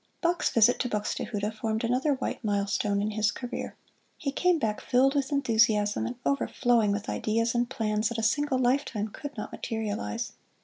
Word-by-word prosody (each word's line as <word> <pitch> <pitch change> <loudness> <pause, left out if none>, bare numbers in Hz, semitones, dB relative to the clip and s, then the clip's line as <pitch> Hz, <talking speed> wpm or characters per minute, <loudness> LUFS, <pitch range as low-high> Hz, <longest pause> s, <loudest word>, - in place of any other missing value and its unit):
Bach's 345 +1 +1
visit 230 +1 +4
to 250 - -1
Buxtehude 210 0 -2
formed 220 +1 -2
another 255 +5 +1
white 260 - -4
milestone 205 0 0
in 215 - -1
his 215 0 +1
career. 245 -1 -5 0.4
He 280 -4 -2
came 360 +4 +2
back 220 -8 -1
filled 265 +2 +3
with 280 -1 0
enthusiasm 225 -6 +2
and 240 - -5
overflowing 240 -5 +2
with 205 +1 -2
ideas 230 +2 0
and 240 0 0
plans 215 -2 0
that 235 - -4
a 225 - -2
single 280 +4 +2
lifetime 245 -4 0
could 290 +5 -8
not 210 - -5
materialize. 205 - -3
230 Hz, 170 wpm, -28 LUFS, 210-260 Hz, 0.4 s, visit